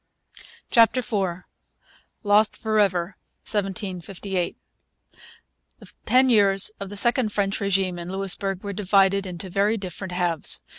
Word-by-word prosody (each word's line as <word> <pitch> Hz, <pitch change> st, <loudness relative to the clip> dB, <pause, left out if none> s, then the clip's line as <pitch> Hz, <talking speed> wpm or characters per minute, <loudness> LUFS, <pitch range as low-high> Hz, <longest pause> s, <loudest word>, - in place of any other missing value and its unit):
CHAPTER 230 Hz, +2 st, +4 dB
IV 190 Hz, -6 st, -3 dB, 0.8 s
LOST 205 Hz, +1 st, +3 dB
FOR 220 Hz, -1 st, 0 dB
EVER 185 Hz, -2 st, 0 dB, 0.3 s
1758 195 Hz, -2 st, -3 dB, 1.2 s
The -, -, -15 dB, 0.2 s
ten 255 Hz, +1 st, +4 dB
years 200 Hz, -4 st, +3 dB
of 200 Hz, -1 st, -6 dB
the 205 Hz, -, -7 dB
second 240 Hz, 0 st, +2 dB
French 195 Hz, -1 st, -1 dB
regime 190 Hz, -2 st, 0 dB
in 170 Hz, +1 st, -6 dB
Louisbourg 195 Hz, 0 st, 0 dB
were 200 Hz, -1 st, -4 dB
divided 195 Hz, 0 st, +2 dB
into 180 Hz, 0 st, -6 dB
very 205 Hz, +4 st, +1 dB
different 190 Hz, -1 st, -6 dB
halves. 175 Hz, -3 st, 0 dB
195 Hz, 120 wpm, -24 LUFS, 185-205 Hz, 1.2 s, CHAPTER